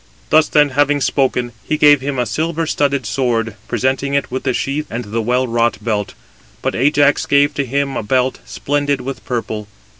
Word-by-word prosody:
Thus 155 -1 +5
then 150 -1 +3
having 145 +2 +2
spoken, 130 -3 0
he 155 - -1
gave 145 -2 +6
him 140 0 -3
a 125 - +1
silver 165 +7 -2
studded 140 -4 0
sword, 115 -3 -1
presenting 130 +4 0
it 140 - -1
with 130 - -2
the 130 - +2
sheath 145 +3 -2
and 120 +2 -4
the 110 +3 -2
well 125 +3 +1
wrought 115 -2 +1
belt. 105 -2 -2 0.5
But - - 0
Ajax 145 +2 +2
gave 145 +1 +3
[to 140 -1 -1
him] 140 +1 -1
a - - -1
belt, 130 +4 0
splendid 145 -1 -1
with 135 +2 -6
purple. 110 -4 -3
135 Hz, 185 wpm, -17 LUFS, 120-145 Hz, 0.5 s, gave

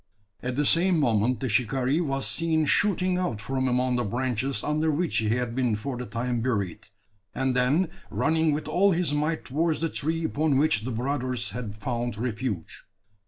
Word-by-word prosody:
At 125 0 -3
the 145 +2 +1
same 175 +3 +4
moment 120 -2 +2
the 130 - -1
shikaree 130 +6 +1
was 135 -4 -1
seen 160 -2 +1
shooting 185 +2 +2
out 125 -13 -2
from 130 +4 -1
among 125 0 +1
the 120 - +1
branches 130 +3 -1
under 155 +2 +1
which 160 +3 0
he 110 -1 +1
had 120 +1 0
been 125 -3 +1
for 125 +5 -4
the 125 0 -5
time 120 0 -2
buried; 100 -8 -2 0.5
and, 130 -1 0
then 140 +9 +3 0.2
running 160 0 +2
with 150 +1 -2
all 185 +5 +3
his 170 -3 +1
might 155 +2 -1
towards 160 +4 0
the 165 +1 0
tree 160 +3 -2
upon 150 -2 +1
which 135 -7 +2
the 130 - -2
brothers 125 -1 -2
had 105 -2 -6
found 120 0 -3
refuge. 115 -5 -4
130 Hz, 180 wpm, -26 LUFS, 120-155 Hz, 0.5 s, same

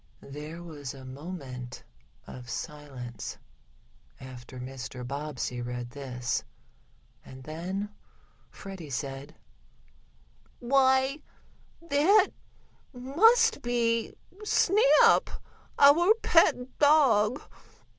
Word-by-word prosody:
There 155 +4 -8
was 145 -6 -8
a 135 -1 -12
moment 130 -3 -8 0.4
of 125 -1 -11
silence 135 -7 -7 0.8
after 130 -1 -11
Mr. 125 -1 -7
Bobbsey 140 -3 -4
read 120 0 -5
this, 130 -2 -3 0.8
and 130 0 -12
then 180 +7 -4 0.6
Freddie 190 -6 -10
said: 135 +3 -5 1.2
"Why 265 +2 +2 0.6
that 335 +7 +4 0.6
must 445 - +3
be 230 -1 0 0.3
Snap 425 +3 +4 0.5
our 340 +9 +6
pet 260 -6 +2
dog! 270 -6 +4
165 Hz, 75 wpm, -28 LUFS, -, 1.2 s, our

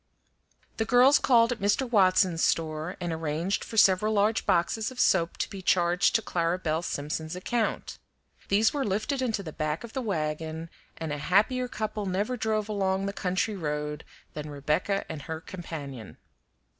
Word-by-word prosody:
The 220 - 0
girls 255 +4 +6
called 235 -2 +4
at 240 - -3
Mr. 205 +6 +1
Watson's 185 -6 +3
store, 160 +2 0
and 175 -2 -2
arranged 160 +4 -2
for 225 - -8
several 210 +1 +4
large 210 +2 +1
boxes 210 +6 +1
of 255 -1 -11
soap 170 -3 +2
to - - -1
be 195 - -8
charged 175 -1 +2
to 225 - +2
Clara 170 0 0
Belle 160 -3 -1
Simpson's 155 +1 -4
account. 225 +5 -2 0.5
These 210 +3 +3
were 285 -2 0
lifted 220 +7 -1
into 225 -5 -1
the 155 -4 -7
back 155 +3 -2
of 235 - -9
the 265 - -2
wagon, 160 -4 -3 0.3
and 160 -2 -4
a 145 - -4
happier 220 - +2
couple 215 -3 -4
never 205 +7 -1
drove 215 -2 -1
along 195 -2 0
the 200 - -3
country 190 +3 -1
road 150 -3 -3 0.3
than 150 0 -6
Rebecca 150 +7 -1
and 155 -2 -6
her 160 +3 -5
companion. 150 -9 -8
185 Hz, 170 wpm, -27 LUFS, 160-215 Hz, 0.5 s, girls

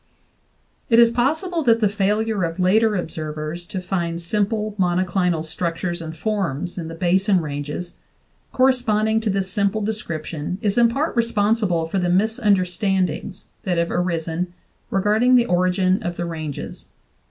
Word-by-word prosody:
It 230 - +5
is 235 -1 +7
possible 315 +9 0
that 230 -5 +4
the 215 - +3
failure 210 +1 0
of 165 +1 -3
later 210 +4 +3
observers 155 -1 -4
to 185 -2 -5
find 170 -2 -2
simple 210 +4 -1
monoclinal 180 -2 +1
structures 170 +1 -3
and 160 0 -7
forms 180 -4 -2
in 165 - -5
the 165 - -7
Basin 190 +3 +2
ranges 150 +3 -5 0.6
corre 260 +1 +4
sponding 220 -3 +1
to 220 - -1
this 195 -1 -1
simple 200 +2 +1
description 170 -5 -4
is 205 -1 0
in 235 -1 +5
part 285 +7 -1
responsible 210 -6 +1
for 175 +4 -2
the 180 -1 0
misunderstandings 190 -1 0 0.2
that 180 -3 -1
have 170 0 0
arisen 175 0 -1 0.4
regarding 215 +6 +3
the 240 -1 +5
origin 185 -1 +2
of 175 0 -4
the 175 - -2
ranges. 155 -4 -6
185 Hz, 145 wpm, -22 LUFS, 170-215 Hz, 0.6 s, is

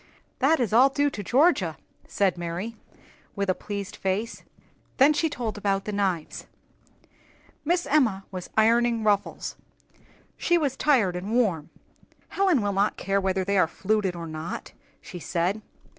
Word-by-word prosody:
"That 300 +5 +3
is 230 -4 0
all 255 +4 +6
due 285 +1 +1
to 210 - -5
Georgia," 245 - +2 0.3
said 195 -3 +1
Mary, 175 +6 -5 0.6
with 200 -1 0
a - - +1
pleased 200 0 -6
face. 195 +5 -2 0.6
Then 285 +3 +6
she 320 +2 +1
told 230 -7 -4
about 195 -1 0
the 210 - -3
knives. 190 -6 -2 1.2
Miss 345 +3 +1
Emma 235 -10 +2
was 185 -2 -7
ironing 230 +1 +3
ruffles; 205 -2 -1 0.8
she 345 - +2
was 285 -5 0
tired 240 -12 +2
and 190 +5 -4
warm. 185 -11 +1 0.6
"Helen 370 - +2
will 205 -1 0
not 200 +2 +1
care 195 +1 0
whether 190 -1 0
they 200 0 +2
are - - +4
fluted 195 +1 -1
or 170 -1 -6
not," 155 +1 -6 0.3
she 180 - -9
said. 180 +5 -1
205 Hz, 150 wpm, -26 LUFS, 190-250 Hz, 1.2 s, all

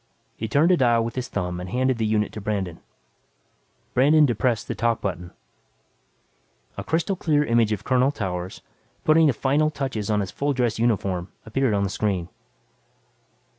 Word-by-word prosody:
He 110 - -4
turned 150 +10 +3
a 180 - +4
dial 120 -4 +3
with 115 - -4
his 125 -1 -4
thumb 90 -3 -3
and 90 0 -6
handed 130 +2 0
the 110 - +1
unit 105 -1 0
to 105 - -7
Brandon. 100 -5 -3 1.1
Brandon 150 +4 +5
depressed 120 -2 0
the - - -2
"talk" 115 -1 0
button. 90 -4 -4 1.5
A - - -5
crystal 170 +5 0
clear 150 -4 +1
image 115 -3 +2
of 105 - -2
Colonel 130 0 +3
Towers, 95 -8 -5 0.4
putting 155 +1 +5
the 140 - +3
finishing 145 +6 +1
touches 130 -8 -4
on 105 -1 +2
his 95 - -4
full 145 0 -1
dress 120 -4 0
uniform, 95 -6 0
appeared 120 0 0
on 100 - +1
the 100 - -1
screen. 95 -5 -1
115 Hz, 170 wpm, -24 LUFS, 100-135 Hz, 1.5 s, Brandon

